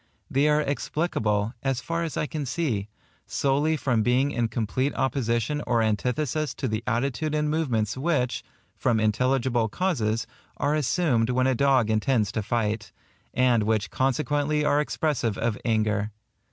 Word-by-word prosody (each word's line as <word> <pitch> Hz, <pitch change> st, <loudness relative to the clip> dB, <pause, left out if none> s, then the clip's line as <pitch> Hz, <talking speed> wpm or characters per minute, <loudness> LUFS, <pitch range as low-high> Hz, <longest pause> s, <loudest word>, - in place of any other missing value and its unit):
They 140 Hz, +3 st, +3 dB
are 150 Hz, 0 st, +3 dB
explicable, 115 Hz, -7 st, -1 dB
as 135 Hz, -2 st, 0 dB
far 165 Hz, +7 st, -2 dB
as 160 Hz, -5 st, -4 dB
I -, -, +1 dB
can 150 Hz, 0 st, -4 dB
see, 120 Hz, -8 st, -1 dB, 0.4 s
solely 145 Hz, +3 st, +1 dB
from 125 Hz, -6 st, +1 dB
being 125 Hz, +5 st, +2 dB
in 120 Hz, -4 st, 0 dB
complete 120 Hz, +5 st, -1 dB
opposition 130 Hz, +2 st, 0 dB
or 115 Hz, -2 st, +2 dB
antithesis 125 Hz, +7 st, -1 dB
to 135 Hz, -, -2 dB
the 110 Hz, 0 st, -2 dB
attitude 140 Hz, +6 st, 0 dB
and 150 Hz, 0 st, +1 dB
movements 120 Hz, -10 st, 0 dB
which, 130 Hz, -3 st, 0 dB, 0.3 s
from 115 Hz, -2 st, +1 dB
intelligible 120 Hz, +1 st, +1 dB
causes, 115 Hz, -, 0 dB, 0.3 s
are 145 Hz, -, +1 dB
assumed 145 Hz, -5 st, +1 dB
when 130 Hz, +1 st, +2 dB
a 130 Hz, -, +3 dB
dog 130 Hz, -3 st, +3 dB
intends 110 Hz, -1 st, +1 dB
to 110 Hz, -, -2 dB
fight, 105 Hz, 0 st, -1 dB, 0.4 s
and 125 Hz, -2 st, +3 dB
which 105 Hz, -2 st, 0 dB
consequently 145 Hz, +3 st, +1 dB
are 150 Hz, 0 st, +3 dB
expressive 145 Hz, -8 st, -1 dB
of 115 Hz, -2 st, 0 dB
anger. 110 Hz, -2 st, +1 dB
125 Hz, 150 wpm, -26 LUFS, 110-145 Hz, 0.4 s, They